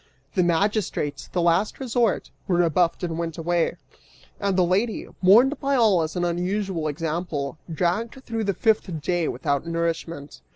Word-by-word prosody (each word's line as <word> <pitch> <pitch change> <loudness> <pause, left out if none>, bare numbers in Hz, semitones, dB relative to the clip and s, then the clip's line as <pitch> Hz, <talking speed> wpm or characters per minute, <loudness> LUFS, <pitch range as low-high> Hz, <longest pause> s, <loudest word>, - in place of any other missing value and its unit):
The 185 - +2
magistrates, 175 -3 0
the 175 - -1
last 175 +5 +2
resort, 240 -5 0 0.2
were 180 - +2
rebuffed 170 +1 +2
and 165 -1 -2
went 165 -2 -3
away, 170 0 0 0.6
and 200 -2 0
the 180 - +4
lady, 205 +6 0
mourned 235 +10 +6
by 280 -1 +1
all 215 -8 +4
as 155 0 -3
an 175 -1 0
unusual 180 -1 -1
example, 155 -1 -3
dragged 210 +10 -1
through 225 -2 -2
the 200 -1 0
fifth 210 -7 +1
day 175 +1 0
without 145 0 -1
nourishment. 165 -3 -3
175 Hz, 155 wpm, -24 LUFS, 165-205 Hz, 0.6 s, mourned